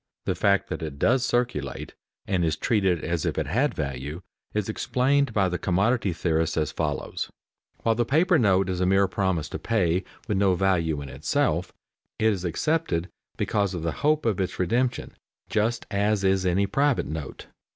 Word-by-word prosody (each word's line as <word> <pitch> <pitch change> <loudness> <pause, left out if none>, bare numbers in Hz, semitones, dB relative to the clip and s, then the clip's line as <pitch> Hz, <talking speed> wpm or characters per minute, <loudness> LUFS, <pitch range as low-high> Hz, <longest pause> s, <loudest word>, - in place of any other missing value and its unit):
The - - +1
fact 100 -1 +2
that - - -4
it 75 -3 -5
does 125 - +3
circulate, 120 - -1 0.3
and 95 -3 0
is 80 -2 +1
treated 95 -5 +1
as 85 -1 -1
if - - -1
it - - 0
had 135 +8 +1
value, 70 +4 -4 0.3
is 105 -2 -1
explained 135 +5 +1
by 100 -3 +2
the 90 -1 -2
commodity 100 +3 +1
theorists 80 -1 0
as 75 -2 0
follows: - - -3 0.5
While 115 - +3
the 120 +2 +1
paper 165 +7 +3
note 95 -4 +3
is 90 -1 -2
a 90 - +2
mere 95 +1 +4
promise 95 -5 -1
to - - -5
pay, 95 -5 +1 0.2
with 100 -2 0
no 95 -2 +3
value 85 -5 +1
in 70 - -8
itself, 85 +6 0 0.5
it 110 0 +3
is 95 -3 -5
accepted 90 - 0 0.3
because 100 -3 0
of 85 - -4
the 85 - 0
hope 150 0 +2
of 105 -4 +1
its 95 - -3
redemption, 120 +7 0 0.4
just 110 +3 0
as 100 0 +1
is 95 -1 +2
any 95 +3 +2
private 140 +5 +1
note. 75 -1 -6
95 Hz, 180 wpm, -26 LUFS, 85-115 Hz, 0.5 s, mere